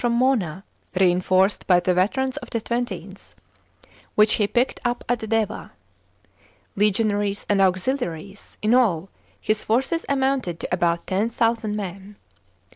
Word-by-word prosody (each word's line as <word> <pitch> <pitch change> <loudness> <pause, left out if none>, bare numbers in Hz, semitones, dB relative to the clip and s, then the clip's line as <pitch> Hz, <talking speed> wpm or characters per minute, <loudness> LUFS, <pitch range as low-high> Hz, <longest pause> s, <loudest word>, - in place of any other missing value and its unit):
from 240 -1 +2
Mona, 225 - +1 0.4
reinforced 185 +2 +2
by 180 -2 +5
the 180 +1 +1
veterans 255 +9 +1
of - - -7
the 230 - -1
XXth, 210 -5 -5 0.8
which 210 0 +5
he 205 - +3
picked 245 +4 0
up 240 0 -1
at 245 0 0
Deva. 220 -2 -1 1.0
Legionaries 205 0 +1
and 200 -1 +2
auxiliaries, 190 - -2
in 215 +2 +3
all, 195 -8 +2 0.3
his 215 0 -1
forces 265 +9 0
amounted 265 -10 0
to - - -4
about 170 -1 +1
10,000 225 +2 0
men. 195 0 -6
210 Hz, 125 wpm, -23 LUFS, 185-240 Hz, 1.0 s, by